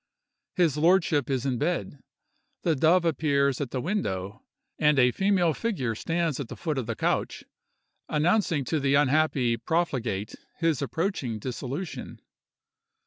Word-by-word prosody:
His 165 -6 +2
lordship 165 -4 +3
is 130 -1 -1
in 130 -3 -1
bed; 155 -3 -2 0.6
the 165 -3 +2
dove 165 +5 +3
appears 140 -3 +1
at 140 - -2
the 130 - -3
window; 105 - -3 0.4
and 150 -2 +4
a 125 -1 +5
female 190 -1 +2
figure 160 - -2
stands 165 +4 -1
at 140 - -4
the - - -8
foot 155 -5 -2
of 120 - -4
the 115 - -2
couch, - - -1 0.7
announcing 160 -1 +1
to 155 - 0
the 140 0 +2
unhappy 140 -4 +2
profligate 120 - -1 0.2
his 165 -5 +1
approaching 140 - -2
dissolution. 130 - -6
150 Hz, 140 wpm, -27 LUFS, 130-165 Hz, 0.7 s, a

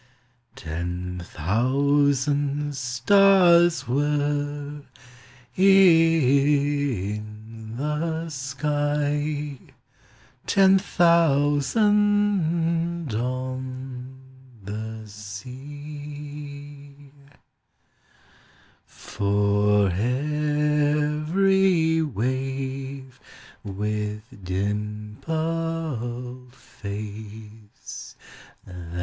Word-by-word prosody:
Ten 90 +3 -5
thousand 140 - +1
stars 175 +6 +4
were 145 +1 -1 0.7
in 140 - +2
the 160 +3 -2
sky, 145 +1 -2 0.9
Ten 195 0 +5
thousand 170 - +2
on 130 +1 -5 0.5
the 110 +2 -6
sea; 145 +6 -9 1.9
For 105 0 +1
every 150 - +1
wave, 130 +1 -3 0.4
with 105 +1 -3 0.2
dimpled 125 - -3
face. 105 -1 -9
140 Hz, 35 wpm, -24 LUFS, 110-150 Hz, 1.9 s, Ten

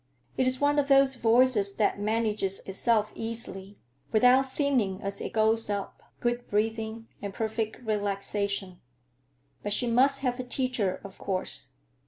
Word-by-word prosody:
It 260 - +1
is 255 0 +1
one 290 0 +3
of 280 - 0
those 275 -1 +5
voices 230 -4 +3
that 205 -2 +1
manages 210 -2 0
itself 215 +2 +1
easily, 205 -3 -5 0.3
without 250 +4 +4
thinning 255 -10 0
as 200 0 -3
it - - -4
goes 220 0 +1
up; 200 -1 -4 0.2
good 240 0 -2
breathing 220 +1 -2
and 200 -1 -6
perfect 220 0 -3
relaxation. 200 -2 -2 0.8
But 205 - -1
she 245 - +1
must 265 +4 +3
have 250 -2 -1
a - - -2
teacher, 245 -7 -1
of 200 -1 -11
course. 60 - -1
220 Hz, 145 wpm, -28 LUFS, 200-250 Hz, 0.8 s, those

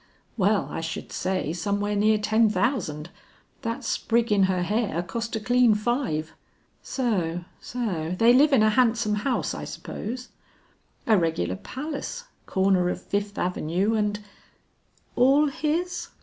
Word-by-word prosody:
"Well 205 -1 +2
I - - -3
should 160 0 -5
say 185 -4 -1
some 200 +4 -1
where 205 0 -1
near 215 +1 +3
ten 215 +1 +3
thousand; 175 - -1 0.5
that 230 +4 -3
sprig 235 0 0
in 200 -2 +5
her 180 -1 +1
hair 205 -3 -1
cost 230 +6 -4
a - - -1
clean 245 0 +4
five." 210 - -1 0.5
"So, 180 -9 -1
so. 185 -9 -3
They 230 +3 +6
live 290 +4 +5
in 250 -6 +5
a 215 - +4
handsome 230 -2 +2
house 210 +5 -1
I - - -6
suppose?" 250 +4 -6 0.8
"A 215 -4 +4
regular 160 - -1
palace, 295 - -6 0.2
corner 190 -2 +2
of - - -3
Fifth 205 0 -3
Avenue 180 +4 0
and 210 -1 0 0.5
" - - -39
"All 275 +4 +4
his?" 320 +5 -2
210 Hz, 145 wpm, -25 LUFS, 185-245 Hz, 0.8 s, They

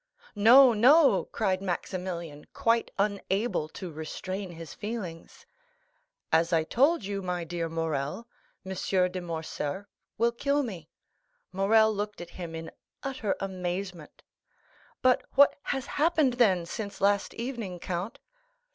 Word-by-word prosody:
"No, 240 +5 +8
no," 275 +8 +5
cried 190 -4 -1
Maximilian, 175 -4 -4
quite 230 0 +1
unable 200 -3 -1
to 180 +1 -7
restrain 185 +5 -5
his 165 -2 -9
feelings. 205 -7 -7 0.9
"As 165 +2 +3
I 165 -2 +3
told 270 - +2
you, 200 0 -3
my 180 -2 -2
dear 170 0 -3
Morrel, 160 - -3 0.4
M. 190 0 -5 0.4
de 185 0 -4
Morcerf 165 +1 -4 0.3
will 235 +1 +3
kill 280 +4 0
me." 180 - -7 0.6
Morrel 220 +3 +4
looked 210 0 -4
at 175 0 -8
him 170 -3 -7
in 165 0 -7 0.3
utter 260 -7 -2
amazement. 180 -3 -5 0.8
"But 255 -1 +4
what 280 +1 +6
has 270 -2 -2
happened, 305 -4 +2
then, 195 -8 +3
since 200 +3 -6
last 200 0 +1
evening, 230 -7 -5
count?" 180 +5 -4
195 Hz, 125 wpm, -28 LUFS, 170-230 Hz, 0.9 s, No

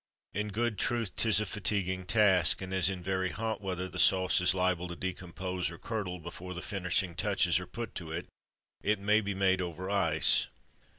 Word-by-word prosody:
In 105 +1 -2
good 110 0 -1
truth 115 -5 -1
'tis 110 -2 +4
a 105 - 0
"fatiguing" 95 -2 -2
task; 95 -6 +4
and 95 0 -6
as 95 -1 +3
in 95 -2 -5
very 95 0 0
hot 110 +1 -3
weather 95 -2 -3
the 90 - -7
sauce 95 -1 +4
is 90 +1 +3
liable 90 -1 +1
to 85 - -6
decompose, 90 0 -4
or 85 - -9
"curdle," 105 -5 -4
before 90 +2 -8
the 90 - -5
finishing 90 -2 0
touches 85 - +2
are - - -8
put 115 -2 -6
to 85 -4 -7
it, 85 +2 -4 0.6
it 105 +1 +1
may 105 +2 +3
be 100 -1 -3
made 95 -1 +2
over 90 +2 -4
ice. 85 -6 +3
95 Hz, 190 wpm, -31 LUFS, 90-100 Hz, 0.6 s, tis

